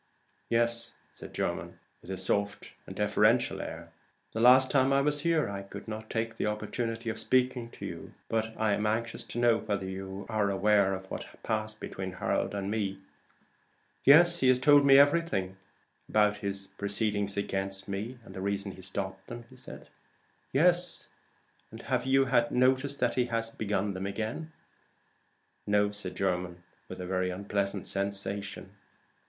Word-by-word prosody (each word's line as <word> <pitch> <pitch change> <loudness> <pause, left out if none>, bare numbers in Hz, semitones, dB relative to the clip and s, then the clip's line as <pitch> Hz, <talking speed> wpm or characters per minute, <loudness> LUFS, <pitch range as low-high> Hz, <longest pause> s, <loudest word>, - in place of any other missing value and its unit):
"Yes," 115 0 +3 0.2
said - - -10
Jermyn, - - -3 0.2
with - - -14
his 95 -1 -3
soft 100 +1 -1 0.2
and - - -8
deferential - - +2
air. - - -8 0.4
"The 110 - -4
last 130 +2 +6
time 135 -1 +3
I 135 - +4
was 145 +1 0
here 165 -1 +2
I 100 -1 -5
could 100 - -10
not 110 0 -6
take 115 0 -2
the - - -1
opportunity 115 +2 -3
of 110 - -6
speaking 125 0 +1
to - - -9
you. - - -7 0.2
But 110 0 -1
I 110 -2 +2
am 105 +1 0
anxious 115 +2 -1
to - - -8
know 120 -1 +4
whether 100 -2 -2
you 95 +1 -6
are 110 -3 0
aware 100 0 +3
of 95 0 -8
what - - -4
has - - -17
passed 110 -1 -2
between 95 0 -5
me - - -9
and - - -13
Harold?" 100 -1 -1 1.0
"Yes, 170 +4 +7
he 130 - +3
has 130 - +5
told 145 +1 +6
me 135 0 +8
everything." 140 - +3 0.5
"About 105 -1 +3
his 100 -1 -3
proceedings 100 0 -1
against 95 -1 -2
me? 105 +6 -4
and - - -12
the 95 - -6
reason 100 0 -2
he 95 - -12
stopped 95 0 -5
them?" 120 -1 -8 1.1
"Yes: 175 +5 +2 0.8
have - - -1
you 135 0 +4
had 120 -2 +2
notice 130 +3 +2
that 125 -1 +1
he 125 - +1
has 115 -1 -1
begun 105 -2 -1
them 95 +1 -4
again?" 110 +10 -4 1.2
"No," 105 0 +3
said 100 -3 -6
Jermyn, 90 -2 -2 0.3
with - - -8
a 90 - -4
very 95 0 0
unpleasant 100 +1 -2
sensation. 100 0 -3
105 Hz, 160 wpm, -29 LUFS, 100-120 Hz, 1.2 s, me